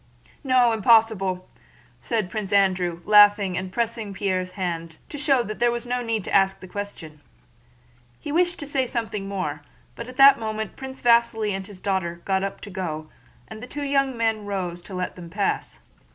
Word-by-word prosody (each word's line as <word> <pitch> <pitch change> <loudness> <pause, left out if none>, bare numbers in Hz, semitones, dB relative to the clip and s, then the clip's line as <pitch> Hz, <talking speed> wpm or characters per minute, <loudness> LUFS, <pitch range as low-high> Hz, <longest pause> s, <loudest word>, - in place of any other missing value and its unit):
"No, 255 -3 +4
impossible!" 220 -4 +3 0.5
said 220 -6 -2
Prince 215 -3 -4
Andrew, 185 -4 +2
laughing 205 -2 +6
and 185 +1 -4
pressing 225 -2 -2
Pierre's 185 -2 -1
hand 165 -3 -4
to 290 - -7
show 275 -4 +3
that 215 -1 -6
there 240 0 +3
was 235 0 -4
no 245 0 -1
need 225 -3 -2
to - - -5
ask 195 -1 +3
the 185 - -11
question. 180 -6 -7 1.0
He 295 - -6
wished 350 +2 +2
to 290 - -6
say 270 -3 -1
something 220 -4 -3
more, 180 -7 -3 0.3
but 235 - -7
at 255 0 -11
that 275 -1 +8
moment 220 -1 -4
Prince 265 0 -9
Vasíli 235 -3 +3
and 195 0 -4
his 200 -3 -11
daughter 175 -3 -2
got 190 -1 +1
up 195 - -4
to 205 - -9
go 155 -5 -5 0.4
and 220 0 -10
the 250 - -8
two 290 +2 -5
young 275 -2 +1
men 220 -2 0
rose 180 -3 -3
to 190 +2 -9
let 180 0 -3
them 175 -2 -10
pass. 200 +3 -2
205 Hz, 185 wpm, -24 LUFS, 185-235 Hz, 1.0 s, that